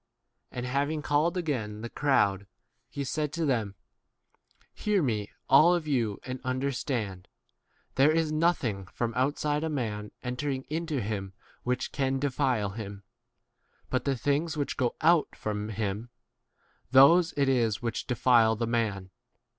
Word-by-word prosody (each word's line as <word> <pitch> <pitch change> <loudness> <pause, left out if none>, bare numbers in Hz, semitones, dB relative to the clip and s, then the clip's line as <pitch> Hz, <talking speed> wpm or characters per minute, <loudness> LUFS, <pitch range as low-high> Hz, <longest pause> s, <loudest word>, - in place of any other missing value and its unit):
And 125 0 -4
having 145 +4 -1
called 155 +6 +1
again 130 -12 -2
h - - -9
the 120 - -4
crowd, 100 -9 +1 0.4
he 140 - -4
said 150 +2 -2
to 165 0 -1
them, 115 -8 0 1.0
Hear 205 -4 +1
me, 105 -6 -1 0.2
all 175 +3 +6
[of 165 -3 -3
you], 120 -8 +1
15 130 - -6
and 130 0 -5
understand: 130 -7 -2 0.7
There 140 +3 +5
is 160 -1 +1
nothing 145 - 0
from 115 +3 -3
outside 145 +4 0
a 160 - -1
man 105 -7 -3
entering 130 +2 -3
into 160 -4 -2
him 100 -2 -4 0.3
which 125 0 -2
can 135 -1 0
defile 130 -6 0
him; 100 -1 -7 0.9
but 130 - 0
the 135 -2 0
things 145 +6 0
which 145 - -2
go 125 -3 0
out 165 0 +3
from 105 0 -3
him, 105 +2 -3 0.8
those 160 +7 +7
it 140 -1 +3
is 120 -4 +1
which 115 -2 -3
defile 120 -3 +4
the 115 +2 -1
16 115 - -4
man. 105 -5 -1
130 Hz, 150 wpm, -28 LUFS, 110-145 Hz, 1.0 s, those